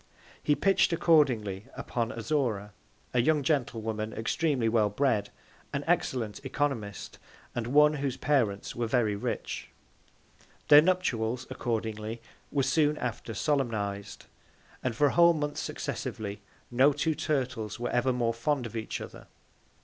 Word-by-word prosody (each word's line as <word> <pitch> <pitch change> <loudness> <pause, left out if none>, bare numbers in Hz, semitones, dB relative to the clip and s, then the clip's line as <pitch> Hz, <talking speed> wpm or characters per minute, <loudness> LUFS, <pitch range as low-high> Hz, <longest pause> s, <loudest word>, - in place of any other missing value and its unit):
He 150 - +2
pitch'd 195 +2 +3
accordingly 125 - +2
upon 115 -2 -2
Azora, 115 -5 -1 0.4
a 125 - +4
young 150 +3 +2
Gentlewoman 110 -6 -1
extremely 130 +1 0
well 110 -2 +3
bred, 105 -2 +1 0.4
an - - -1
excellent 115 -3 0
Oeconomist, 135 - -3 0.3
and 120 -1 -3
one, 150 +3 +5
whose 140 -3 -2
Parents 120 -9 0
were 120 -1 -1
very 110 -3 +2
rich. 100 - -4 1.0
Their 145 0 +10
Nuptials 130 -9 0
accordingly 110 -2 -3 0.3
were 140 -2 +1
soon 150 +2 +2
after 120 -2 -4
solemniz'd, 110 -7 -2 0.6
and 125 -3 -1
for 145 - +3
a 145 - +3
whole 170 0 +6
Month 150 -2 -3
successively, 105 -1 -4 0.3
no 130 +4 +5
two 145 +3 0
Turtles 130 -8 -2
were 120 - -2
ever 125 +2 +2
more 120 -2 0
fond 125 +3 -1
of 115 - -7
each 110 -1 -4
other. - - -10
120 Hz, 135 wpm, -29 LUFS, 110-145 Hz, 1.0 s, Their